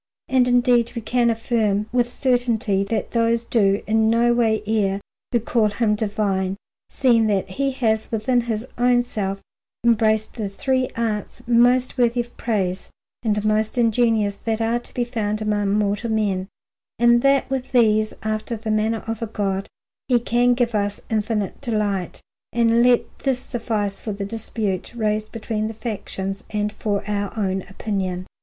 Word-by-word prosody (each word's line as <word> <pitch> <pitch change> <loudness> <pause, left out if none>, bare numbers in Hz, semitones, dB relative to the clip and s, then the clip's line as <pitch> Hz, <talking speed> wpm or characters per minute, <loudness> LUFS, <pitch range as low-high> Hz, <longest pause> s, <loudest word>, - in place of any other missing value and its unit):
And 260 -1 +3
indeed 245 -1 +3
we 235 - -3
can 240 +1 +2
affirm 220 -3 0
with 245 0 +1
certainty 240 -6 +1
that 225 +2 -2
those 230 0 +1
do 200 -4 +2
in 220 0 +2
no 235 +1 +3
way 220 -3 +2
err 200 -2 +1 0.3
who 240 - +3
call 225 -1 +1
him 210 +1 +1
divine, 200 -3 -1 0.3
seeing 235 -4 +3
that 195 -2 0
he 275 +8 0
has 220 -4 0
within 235 +3 +1
his 230 -1 -3
own 245 0 +4
self 195 -5 -3 0.4
embraced 220 -2 +2
the 215 -4 -4
three 260 +5 0
arts 220 -3 -3
most 245 +2 +3
worthy 240 0 +3
of 240 0 -11
praise 195 -5 -2 0.3
and 210 -2 0
most 215 +2 +1
ingenious 225 -3 +2
that 225 +1 -2
are 230 +1 +1
to - - -13
be 245 - +1
found 215 -3 -2
among 210 -2 0
mortal 205 +2 0
men, 200 -4 0 0.5
and 240 +1 +5
that 275 0 +3
with 260 -1 -2
these, 215 -3 +3
after 215 +2 -2
the 220 0 -3
manner 220 +1 0
of 225 0 -4
a 230 - -2
God, 195 -2 -2 0.4
he 250 -2 +4
can 245 +1 +2
give 240 -1 0
us 205 -1 -1
infinite 215 -2 -1
delight. 210 -7 -2 0.3
And 235 0 +3
let 245 0 +5 0.2
this 270 -3 +1
suffice 220 -5 -3
for 215 - -4
the 200 0 -4
dispute 210 -2 -3
raised 215 -1 -1
between 215 -1 -3
the 220 - -6
factions, 200 -3 -4
and 210 0 -1
for 205 -1 -2
our 205 +1 -2
own 190 -2 0
opinion. 190 -3 -3
220 Hz, 165 wpm, -22 LUFS, 205-240 Hz, 0.5 s, and